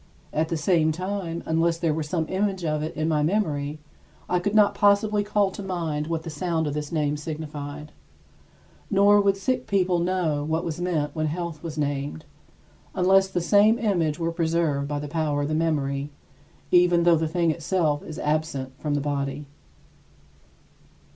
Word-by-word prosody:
At 160 +1 0
the 165 - -1
same 160 -1 +2
time, 180 0 -4
unless 165 +1 +1
there 165 -2 0
were 160 - -2
some 160 +1 -2
image 190 -2 -1
of 155 -1 0
it 155 - -4
in 155 0 -1
my 155 -2 +1
memory, 150 -4 0 0.5
I 180 - +1
could 205 +4 -2
not 210 -1 +5
possibly 205 +1 +3
call 205 -1 +1
to 200 - -7
mind 165 -6 -3
what 165 -1 -2
the 165 - -6
sound 160 +1 -1
of 145 - -2
this 150 -1 -4
name 150 -2 0
signified. 150 -1 -6 1.0
Nor 205 0 +5
would 195 -1 +2
sick 255 +5 -1
people 185 -3 +2
know 170 -4 0
what 160 +2 -1
was 165 0 -4
meant 155 -5 -1
when 155 -1 0
health 165 -1 -4
was 160 -2 -6
named, 145 +1 -2 0.7
unless 190 +1 +4
the 180 -2 -2
same 205 +5 +4
image 175 -9 0
were 165 0 -1
preserved 165 -4 0
by 145 0 -2
the 145 0 -4
power 150 -1 -1
of 155 +2 -1
memory, 145 -3 -1 0.6
even 175 -1 +5
though 170 -1 +5
the 160 0 0
thing 170 +1 +1
itself 155 -2 0
is 155 - -8
absent 150 -3 -1
from 150 -1 -1
the 145 - 0
body. 140 0 -3
160 Hz, 175 wpm, -25 LUFS, 150-180 Hz, 1.0 s, not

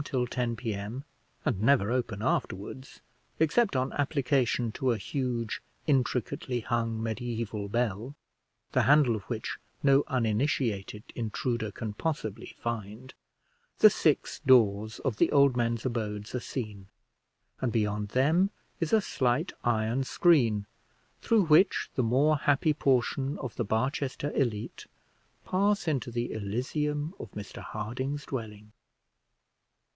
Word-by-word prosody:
till 130 -4 -1
10 120 -1 -2
P.M., 110 +2 -4 0.4
and 95 - 0
never 115 -3 +4
open 120 -5 -1
afterwards, 125 +2 -3 0.4
except 165 +5 +3
on 130 +1 0
application 130 -5 +1
to 130 +4 -1
a 115 - 0
huge, 120 0 -2 0.2
intricately 125 -2 0
hung 115 -1 -1
mediæval 115 -2 -3
bell, 120 +3 -1 0.6
the - - +3
handle 140 -5 +5
of 105 - -4
which - - -4 0.2
no 140 0 +5
uninitiated 115 -4 0
intruder 115 0 -2
can 110 0 -5
possibly 110 -5 -4
find, 115 +2 -5 0.6
the - - +8
six - - +1
doors 110 -3 +4
of 130 -6 -1
the - - +3
old 140 -3 +5
men's 115 -1 0
abodes 105 -4 -3
are 125 - -1
seen, 105 -6 -6 0.7
and 125 - 0
beyond 105 -2 0
them 155 - +3 0.3
is 165 - -1
a 220 - +5
slight 135 0 0
iron 115 +2 +1
screen, 125 - +3 0.6
through 225 -3 +3
which 160 +5 +4
the - - +1
more 140 +7 +3
happy 145 +2 +2
portion 135 0 +1
of 130 -5 -6
the - - -1
Barchester 130 +6 -1
elite 115 -6 -2 0.6
pass 200 0 +1
into 140 -5 0
the 120 0 -2
Elysium 145 - -2
of - - -7
Mr 105 -1 -8
Harding's 130 +7 -4
dwelling. 105 -4 -6
120 Hz, 125 wpm, -29 LUFS, 110-140 Hz, 0.7 s, the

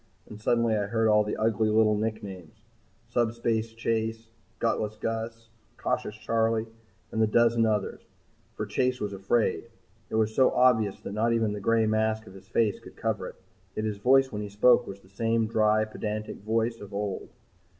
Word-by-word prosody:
And 105 0 -11
suddenly 115 0 +2
I 105 -1 -1
heard 115 +1 +1
all 105 0 +5
the 105 - -3
ugly 110 0 +1
little 110 0 +4
nicknames 105 -2 -5 0.4
Subspace 115 -1 0
Chase, 115 0 -2 0.3
Gutless 105 0 -1
Gus, 115 +1 -4 0.3
Cautious 105 - -2
Charley 115 0 0 0.5
and 110 - 0
the 110 - +4
dozen 115 +1 +3
others. 105 -2 -1 0.5
For - - -3
Chase 125 0 0
was 105 -1 -3
afraid. 100 +5 0 0.4
It - - -4
was 110 0 +1
so 130 +3 +5
obvious 110 -6 +3
that - - -6
not 115 +2 +1
even 110 -2 +1
the 105 - -4
gray 115 +2 +2
mask 110 0 0
of 95 - -13
his 95 - -14
face 110 -4 +1
could - - -14
cover - - -2
it. - - -10 0.4
Yet 110 - -2
his 105 -2 -2
voice 130 +5 +4
when 105 - -4
he 105 - -5
spoke 120 +4 +4
was 100 0 -8
the - - -21
same 115 +3 0
dry, 110 -1 +2
pedantic 110 0 -5
voice 115 +2 -1
of 100 -1 -9
old. 100 -2 -3
110 Hz, 180 wpm, -27 LUFS, 105-115 Hz, 0.5 s, all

